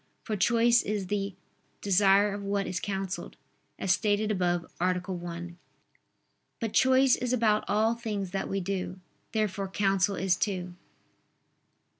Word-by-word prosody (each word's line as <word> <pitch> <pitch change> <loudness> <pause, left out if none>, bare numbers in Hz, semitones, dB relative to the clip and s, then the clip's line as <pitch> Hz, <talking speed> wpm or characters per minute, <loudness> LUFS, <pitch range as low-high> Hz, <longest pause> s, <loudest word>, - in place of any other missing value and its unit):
For 215 - -2
choice 235 +4 +4
is 205 -2 -2
the 200 0 -2 0.4
"desire 200 +1 +4
of 205 - -5
what 200 0 -1
is 185 - -3
counselled" 195 -2 -4 0.4
as 195 - 0
stated 210 +2 +1
above 175 -3 0 0.2
(A. 180 +1 +3
1). 175 -1 -6 1.0
But 225 -3 -3
choice 260 0 +5
is 250 0 -2
about 220 -3 +2
all 220 +2 +2
things 210 -5 -4
that 195 - -3
we 195 0 -1
do. 185 -1 -3 0.3
Therefore 205 -3 -1
counsel 195 0 +1
is 185 -2 +1
too. 180 -3 -2
200 Hz, 135 wpm, -28 LUFS, 185-215 Hz, 1.0 s, choice